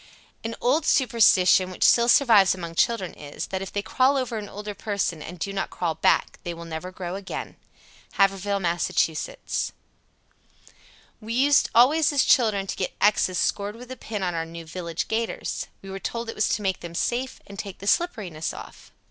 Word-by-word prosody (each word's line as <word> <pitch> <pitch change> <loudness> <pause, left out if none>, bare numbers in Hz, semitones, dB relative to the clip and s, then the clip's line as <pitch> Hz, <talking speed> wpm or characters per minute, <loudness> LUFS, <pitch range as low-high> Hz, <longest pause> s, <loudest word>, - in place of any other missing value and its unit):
_ - - -22 0.4
97. 225 - -3
An - - -10
old 280 +6 +2
superstition 205 -9 +4
which 185 - -3
still 235 0 +5
survives 225 -7 +6
among 170 -2 -7
children 190 +1 +1
is, 145 -1 -7
that 190 0 -3
if 195 - -6
they 205 - -2
crawl 265 +5 +2
over 245 -4 -2
an 205 -1 -8
older 210 +1 -6
person 200 -5 -2
and 180 +4 -8
do 195 +4 -4
not 195 - -2
crawl 170 -3 -2
back - - +1
they 175 -1 -4
will 170 0 -9
never 165 +3 -6
grow 180 -1 -6
again. 195 0 -6 0.6
Haverhill, 195 0 +1
Mass. 175 -2 0
98. 160 -1 -1 1.5
"We 220 +1 -5
used 285 +3 +4
always 290 +7 +5
as 285 -2 +3
children 215 -7 +3
to - - -4
get 185 - -3
X's 195 -3 +3
scored 205 +4 -1
with 250 +2 -11
a - - -5
pin 210 -5 -5
on 180 -1 -1
our 165 -1 -1
new 165 0 -9
'village 170 0 -4
gaiters.' 225 +1 -3 0.2
We 195 - -8
were 195 - -5
told 230 +3 -4
it - - -5
was 215 - +1
to 210 - -6
make 190 -1 0
them 170 -1 -9
safe 245 +7 -2
and 200 0 -11
take 200 -3 -6
the 200 - -10
slipperiness 200 - -1
off." - - -12
200 Hz, 200 wpm, -25 LUFS, 180-230 Hz, 1.5 s, survives